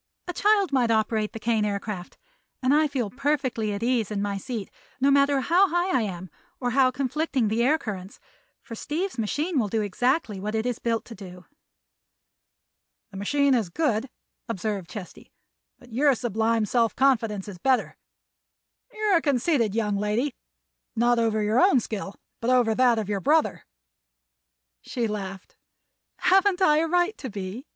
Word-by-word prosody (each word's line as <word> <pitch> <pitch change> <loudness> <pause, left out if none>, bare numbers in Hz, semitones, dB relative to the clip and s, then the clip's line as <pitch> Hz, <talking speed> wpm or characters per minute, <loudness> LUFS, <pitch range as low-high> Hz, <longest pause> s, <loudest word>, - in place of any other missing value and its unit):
A 355 - -3
child 405 -3 +2
might 250 -3 +2
operate 220 -1 +1
the 225 - -7
Kane 225 -1 +1
Aircraft, 200 -2 -4 0.5
and 255 +2 +3
I 305 +1 +4
feel 255 -8 -3
perfectly 260 -5 -1
at 200 +2 -4
ease 240 -3 +1
in 210 -2 -3
my 200 0 -2
seat, 205 +1 -5 0.3
no 275 +2 +3
matter 280 0 +3
how 365 +7 +3
high 350 +2 0
I 255 - +3
am 185 -4 -5 0.3
or 245 -2 -1
how 260 +1 +4
conflicting 265 -2 -1
the 225 +2 0
air 295 +6 +3
currents; 195 -8 -7 0.4
for 235 - -10
Steve's 310 - -3
machine 295 - -1
will 220 - +1
do 215 +1 -1
exactly 225 - 0
what 210 +3 -3
it 220 +1 -1
is 245 -2 -2
built 230 -1 -1
to 235 - -10
do." 180 -3 -11 1.7
"The 195 - -9
machine 280 +7 +2
is 225 -8 +1
good," 245 - -1 0.4
observed 200 -4 -3
Chesty, 200 -5 -10 0.5
"but 245 -2 -17
your 275 +2 +3
sublime 225 -1 0
self 230 +1 +1
confidence 225 -7 +1
is 190 -4 -9
better. 260 +5 +1 1.0
You're 425 -5 +2
a - - 0
conceited 255 - +1
young 210 -3 0
lady—not 240 +1 -2
over 220 -2 +1
your 215 +3 +2
own 365 -8 +5
skill, 205 -3 -5 0.2
but 230 - -2
over 245 -3 +3
that 245 0 +3
of 215 -3 -2
your 200 -2 -2
brother." 305 +5 +1 1.1
She 240 - -3
laughed. 195 -3 -6 0.6
"Haven't 380 0 +3
I 305 -6 +4
a 325 +1 +2
right 355 +5 +1
to 265 - -5
be?" 200 +6 -6
235 Hz, 165 wpm, -25 LUFS, 210-280 Hz, 1.7 s, own